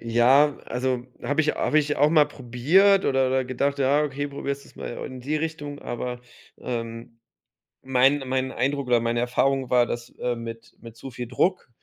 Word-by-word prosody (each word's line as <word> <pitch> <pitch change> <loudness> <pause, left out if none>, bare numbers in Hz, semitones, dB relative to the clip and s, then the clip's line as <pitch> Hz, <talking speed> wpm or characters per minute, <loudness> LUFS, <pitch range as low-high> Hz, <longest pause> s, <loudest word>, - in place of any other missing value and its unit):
Ja, 125 +6 +4
also 125 0 -2 0.2
habe 145 +2 +1
ich 155 -1 +2
habe 155 - +2
ich 150 0 0
auch 150 +1 +4
mal 155 -2 +5
probiert 150 +10 +3
oder 135 -1 +2
oder 130 0 +1
gedacht: 140 +3 -1
„Ja, 140 +2 +3
okay, 145 -1 -2
probierst 140 0 -5
du's - - -20
mal - - -6 0.2
in 130 -1 -9
die 145 +5 -2
Richtung.“ 150 -2 -4
Aber, 120 0 -5 0.4
ähm, 115 -1 -6 0.6
mein 135 +2 +3
mein 130 0 -1
Eindruck 140 0 -1
oder 120 -1 +4
meine 115 +1 -1
Erfahrung 130 +2 0
war, 125 -1 +4
dass 120 0 -5
äh, 125 -1 -1
mit 115 0 -9
mit 115 -1 -12
zu 135 - -8
viel 125 0 -6
Druck, 175 +5 0
130 Hz, 185 wpm, -24 LUFS, 120-145 Hz, 0.6 s, mal